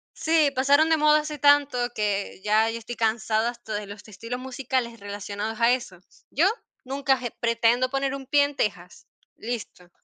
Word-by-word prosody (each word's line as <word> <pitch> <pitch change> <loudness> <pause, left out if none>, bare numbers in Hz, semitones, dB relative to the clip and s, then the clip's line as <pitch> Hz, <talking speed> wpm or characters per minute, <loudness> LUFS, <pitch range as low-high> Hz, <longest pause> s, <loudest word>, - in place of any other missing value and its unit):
Sí, 315 -3 +2
pasaron 285 +4 +4
de 320 - +5
moda 305 0 +4
hace 300 -1 -6
tanto 285 -2 +4 0.2
que 205 -2 -2
ya 215 +1 +3
yo 230 - -4
estoy 230 +1 -7
cansada 220 0 0
hasta 235 -2 -8
de 205 -1 -4
los 205 +2 -11
estilos 230 +5 -6
musicales 255 -3 -3
relacionados 205 +2 -5
a 235 +1 +4
eso, 195 -8 -5 0.3
yo, 320 +7 +2 0.4
nunca 270 0 0 0.2
pretendo 235 +2 +2
poner 275 0 -1
un 270 -2 -7
pie 285 +1 +4
en 285 0 -3
Texas, 180 -6 -4 0.3
listo. 220 -6 -6
240 Hz, 165 wpm, -25 LUFS, 215-275 Hz, 0.4 s, de